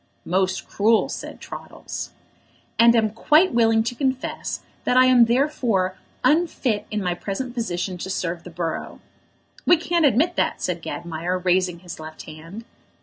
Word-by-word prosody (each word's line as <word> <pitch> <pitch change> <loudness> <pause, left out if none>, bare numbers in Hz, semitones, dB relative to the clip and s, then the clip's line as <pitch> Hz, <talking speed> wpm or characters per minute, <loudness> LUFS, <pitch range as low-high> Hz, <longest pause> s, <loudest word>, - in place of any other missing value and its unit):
"Most 185 +1 0
cruel!" 220 +2 +2
said - - -7
Troddles. - - -7 0.7
"And 235 0 +7
am 220 -2 +2
quite 305 - +4
willing 225 -1 +4
to 235 +2 -2
confess 260 0 -2 0.2
that 250 - +2
I 255 - +7
am 250 -2 +6
therefore 235 -7 +1 0.3
unfit 295 -9 +1
in 210 -2 -2
my 180 -1 0
present 205 +8 -4
position 185 -6 -3
to 190 - -5
serve 170 -2 -3
the 180 - -9
borough." 165 -1 -4 0.6
"We 350 - +5
can't 340 +1 0
admit 300 +8 +2
that," - - +1
said - - -2
Gadmire, 170 +2 -3
raising 180 -1 +1
his 175 -3 -9
left 155 0 -9
hand. 165 +8 -10
215 Hz, 150 wpm, -23 LUFS, 180-255 Hz, 0.7 s, And